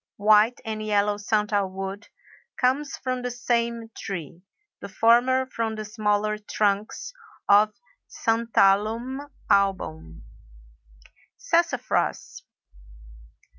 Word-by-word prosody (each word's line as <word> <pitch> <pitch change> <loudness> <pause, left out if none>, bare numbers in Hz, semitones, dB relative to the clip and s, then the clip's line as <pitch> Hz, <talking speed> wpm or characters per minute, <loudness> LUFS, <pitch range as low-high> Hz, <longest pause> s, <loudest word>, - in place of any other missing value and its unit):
White 215 +3 +4
and 215 -1 -4
yellow 205 -1 +1
santal 205 -2 0
wood 195 +2 -6 0.5
comes 270 +3 0
from 255 -1 -3
the 250 - -3
same 235 -2 -2
tree—the 195 - -9
former 240 +5 +3
from 230 -3 -3
the 215 0 -6
smaller 210 0 -1
trunks 210 - -2 0.3
of 210 +1 +5 0.3
Santalum 230 +4 +1 0.2
album. 80 - 0 1.1
SASSAFRAS. - - -1
215 Hz, 85 wpm, -25 LUFS, 200-235 Hz, 1.1 s, of